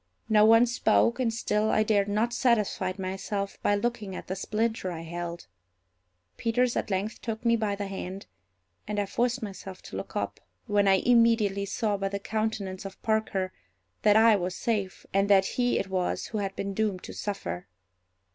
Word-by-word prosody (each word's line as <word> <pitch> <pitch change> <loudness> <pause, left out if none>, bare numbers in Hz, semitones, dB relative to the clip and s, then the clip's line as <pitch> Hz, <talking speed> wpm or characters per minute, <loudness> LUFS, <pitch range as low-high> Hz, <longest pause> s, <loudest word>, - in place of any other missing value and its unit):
No 215 -1 +6
one 225 +2 +7
spoke, 235 0 +2
and 240 -3 +1
still 215 -1 0
I 215 - +3
dared 205 -2 +2
not 215 +4 0
satisfy 210 -6 +1
myself 195 +1 -4
by 205 - +3
looking 210 -3 -2
at - - -7
the 190 - -4
splinter 215 -1 -1
I 165 -2 -5
held. 170 +1 -6 0.9
Peters 240 +1 +1
at - - -1
length 200 +3 -2
took 225 +1 -5
me 230 0 +5
by 215 -3 0
the 200 0 -4
hand, 195 0 -6 0.6
and 210 0 -2
I 205 - +1
forced 240 +4 0
myself 190 -2 -8
to - - -9
look - - -6
up, - - -2 0.3
when 205 -3 +2
I 195 - +6
immediately 225 -3 +3
saw 210 0 0
by 195 0 -1
the 200 - -2
countenance 205 -2 -3
of 195 -1 -8
Parker 210 -4 0 0.5
that 210 -1 +5
I 220 0 +7
was 180 0 -3
safe, 210 -6 -2
and 195 +1 +2
that 195 -1 +6
he 245 +3 +1
it - - -1
was 185 -2 -1
who 215 - -3
had 195 -1 -3
been 200 0 -3
doomed 205 -3 -1
to - - -8
suffer. 90 - -4
205 Hz, 185 wpm, -28 LUFS, 195-225 Hz, 0.9 s, one